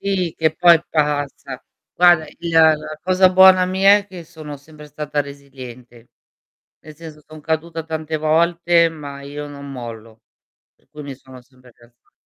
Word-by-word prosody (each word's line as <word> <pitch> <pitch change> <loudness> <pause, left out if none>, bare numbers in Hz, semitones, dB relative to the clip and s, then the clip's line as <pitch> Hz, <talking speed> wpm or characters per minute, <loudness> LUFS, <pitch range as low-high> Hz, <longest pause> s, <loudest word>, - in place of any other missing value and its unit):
Sì, 190 -4 -2
che 160 -1 0
poi 170 -1 +5
passa. 145 -4 -3 0.3
Guarda, 175 -3 +4
il 170 +3 -8
la 160 -1 +5
la 155 0 -9
cosa 185 +2 +3
buona 185 0 +6
mia 195 +2 +4
è 205 - -10
che 180 -4 -11
sono 155 -3 -10
sempre 150 +1 -15
stata 150 0 -4
resiliente. 130 -4 -11 0.7
Nel 155 0 -14
senso 155 -1 -12
son 155 -1 -13
caduta 160 +1 -3
tante 160 0 -4
volte, 170 +2 +2
ma 145 -3 -10
io 145 +1 -8
non 140 -1 -10
mollo. 115 -3 -10 0.5
Per - - -38
cui 150 0 -11
mi 140 -1 -8
sono 130 -1 -15
sempre 125 -1 -22
rialza 120 0 -26
155 Hz, 160 wpm, -19 LUFS, 140-170 Hz, 0.7 s, buona